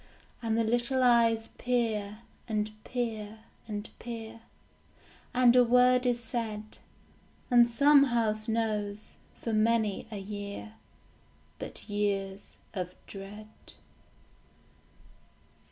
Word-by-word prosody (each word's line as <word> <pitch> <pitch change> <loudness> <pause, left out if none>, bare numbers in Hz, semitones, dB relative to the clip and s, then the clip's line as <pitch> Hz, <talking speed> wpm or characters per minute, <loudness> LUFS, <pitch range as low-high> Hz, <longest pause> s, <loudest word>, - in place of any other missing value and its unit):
And 225 -1 0
the 230 - +3
little 240 +3 +1
eyes 230 -2 +4
peer, 220 -4 -1 0.3
and 215 -1 -1
peer, 220 -3 -4 0.3
and 210 -1 -4
peer; 230 -1 -7 0.9
And 250 -1 +5
a 250 - +8
word 250 +1 +4
is 245 -1 +1
said. 225 -2 -4 0.7
And 240 -1 +6
some 280 +4 +6
house 220 -3 0
knows, 215 -2 -2 0.3
for 230 - -1
many 215 -1 +1
a 210 - -5
year, 205 +2 -6 0.9
But - - -7
years 200 -2 -2 0.2
of 180 -3 -4
dread. 205 +2 -9
225 Hz, 100 wpm, -30 LUFS, 210-240 Hz, 0.9 s, a